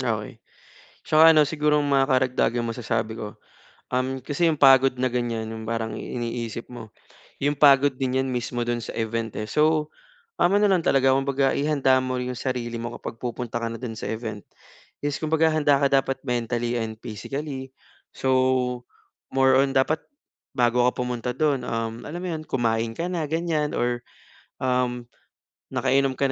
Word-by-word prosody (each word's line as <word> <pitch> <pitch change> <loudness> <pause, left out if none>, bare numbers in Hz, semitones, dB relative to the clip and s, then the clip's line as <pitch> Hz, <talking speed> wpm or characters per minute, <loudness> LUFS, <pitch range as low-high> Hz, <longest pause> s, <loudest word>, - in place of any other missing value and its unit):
Okey. - - -3 0.6
Tsaka 160 +1 +6
ano, 155 - +7
siguro 150 0 +1
mga 140 -1 +2
karagdagang 130 -3 +1
masasabi 115 -1 -3
ko, 105 - -6 0.6
um, 130 0 -1
kasi 160 +4 +1
'yung 160 - +2
pagod 135 -1 +6
na 130 0 -1
ganiyan, 115 -2 -2
'yung 110 0 -7
parang 115 -1 -3
iniisip 115 0 -5
mo, 115 -3 -10 0.5
'yung 145 0 0
pagod 140 -1 +6
din 130 0 -1
'yan 135 - -3
mismo 120 0 -2
do'n 120 0 -1
sa - - -7
event 115 -1 -3
eh. 105 - -3
So, 155 0 +2 0.4
tama 195 +3 +3
na 210 - +4
lang 190 -4 +3
talaga, 135 -3 +3
kumbaga, 135 0 +1
ihanda 140 -3 +2
mo 130 0 -2
'yong 125 0 -3
sarili 120 -3 -3
mo 120 - -4
kapag - - -6
pupunta 120 -1 -4
ka 115 - -2
na 115 - -6
do'n 120 -3 -5
sa 110 - -5
event. 110 -2 -5 0.6
Yes, 145 0 -1
kumbaga, 160 +1 +2
handa 145 -3 +2
ka 140 - +3
dapat 135 -1 +1
mentally 120 0 -1
and 110 -1 -4
physically, 135 +4 -6 0.4
so, 130 -1 +1 0.5
more 130 0 +4
on 135 0 +3
dapat 135 +4 +2 0.6
bago 120 0 +2
ka 125 - +4
pumunta 125 0 -2
do'n, 140 -2 0
um, 115 -1 -2
alam 170 +4 -6
mo 185 - -4
'yon, 155 -2 -4
kumain 115 -3 0
ka 170 +8 -3
na 170 -4 -2
ganiyan 160 -1 -1
or, 120 0 -1 0.5
um, 125 -1 -1 0.6
nakainom 135 -1 +1
ka 140 - 0
130 Hz, 165 wpm, -24 LUFS, 120-140 Hz, 0.6 s, ano